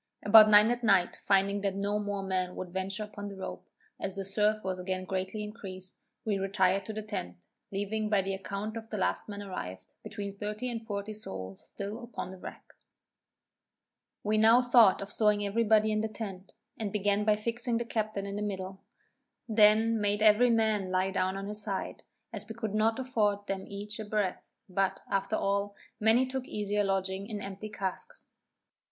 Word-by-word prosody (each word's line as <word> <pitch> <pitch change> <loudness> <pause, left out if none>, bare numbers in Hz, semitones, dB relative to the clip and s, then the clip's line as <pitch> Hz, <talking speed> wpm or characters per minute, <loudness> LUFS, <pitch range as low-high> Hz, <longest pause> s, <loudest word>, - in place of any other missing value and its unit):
About 215 +1 +9
nine 210 +2 +7
at 245 0 -2
night 195 -5 +4
finding 200 0 +2
that 195 -1 -1
no 200 +1 0
more 205 -1 -3
men 185 -1 -1
would 180 -1 -6
venture 190 +2 -2
upon 205 -1 -7
the 200 - -7
rope, 190 - -7 0.3
as 195 -1 -4
the 195 -1 -4
surf 210 +2 +1
was 185 -1 -2
again 185 0 -3
greatly 190 +3 -3
increased, 195 -4 -7 0.2
we 205 -3 0
retired 195 0 +2
to 220 - -5
the 215 0 -4
tent, 145 - -5 0.3
leaving 210 +2 -2
by 205 -2 +3
the 195 +1 -2
account 200 +3 -4
of 225 0 -8
the 215 - -4
last 190 - -1
man 205 0 -6
arrived, 95 - -7
between 200 -1 -6
thirty 210 +5 -3
and 225 -1 -6
forty 205 0 -3
souls 95 - -8
still 205 +4 -6
upon 230 -6 -6
the 190 - -10
wreck. - - -9 1.6
We 215 +1 +2
now 225 +3 +6
thought 235 -6 +6
of 195 - -9
stowing 210 -2 +2
every 215 +3 +1
body 215 0 +4
in 215 0 +1
the 220 - 0
tent, 200 -3 -7 0.2
and 210 -3 -2
began 205 0 +1
by 210 0 +4
fixing 235 +2 -2
the 235 - -2
captain 215 -3 -2
in 200 0 -5
the - - -3
middle. 190 -2 -4 0.7
Then 220 0 +5
made 205 +1 +1
every 220 +3 +6
man 220 -4 +2
lie 185 +1 +1
down 190 0 0
on 195 - -5
his 210 +1 +1
side, 200 -2 -3 0.3
as 215 0 -6
we 225 - -6
could 220 -3 -3
not 220 +1 +2
afford 210 -6 0
them 195 -1 -3
each 205 +2 -7
a 215 - -4
breadth; 205 -3 -2 0.2
but, 195 0 0
after 195 +2 0
all, 200 0 0 0.2
many 225 +4 +4
took 260 0 -4
easier 205 0 0
lodging 195 0 -1
in 210 -2 -4
empty 195 +2 -6
casks. 210 - -5
205 Hz, 190 wpm, -30 LUFS, 195-215 Hz, 1.6 s, About